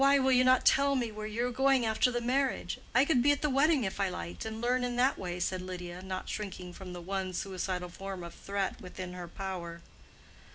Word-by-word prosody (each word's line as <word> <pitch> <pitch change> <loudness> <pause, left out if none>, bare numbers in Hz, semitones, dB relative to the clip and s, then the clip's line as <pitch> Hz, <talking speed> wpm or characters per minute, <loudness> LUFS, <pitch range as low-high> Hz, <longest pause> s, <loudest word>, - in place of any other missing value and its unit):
"Why 275 +1 +6
will 265 -1 +3
you 255 0 +6
not 255 0 +4
tell 280 0 +5
me 240 -4 0
where 215 0 -5
you 230 +3 -1
are 250 - -1
going 265 0 +3
after 220 +3 +3
the 240 -1 -1
marriage? 265 +3 0 0.2
I 270 - +6
could 275 -5 +3
be 285 +4 +5
at 290 - 0
the 300 - +2
wedding 280 0 +4
if 190 0 -3
I 195 -1 +2
liked, 85 - -6
and 220 0 -4
learn 250 +2 +1
in 245 -1 -1
that 255 +3 +3
way," 180 -1 -4
said 185 +1 -1
Lydia, 180 -1 -6
not 185 0 -5
shrinking 185 -4 -5
from 180 0 -8
the 175 - -7
one 190 +1 -3
suicidal 180 -1 -3
form 190 0 -6
of 170 - -8
threat 200 -1 -3
within 185 0 -7
her 180 -1 -6
power. 175 -2 -5
200 Hz, 235 wpm, -31 LUFS, 180-255 Hz, 0.2 s, Why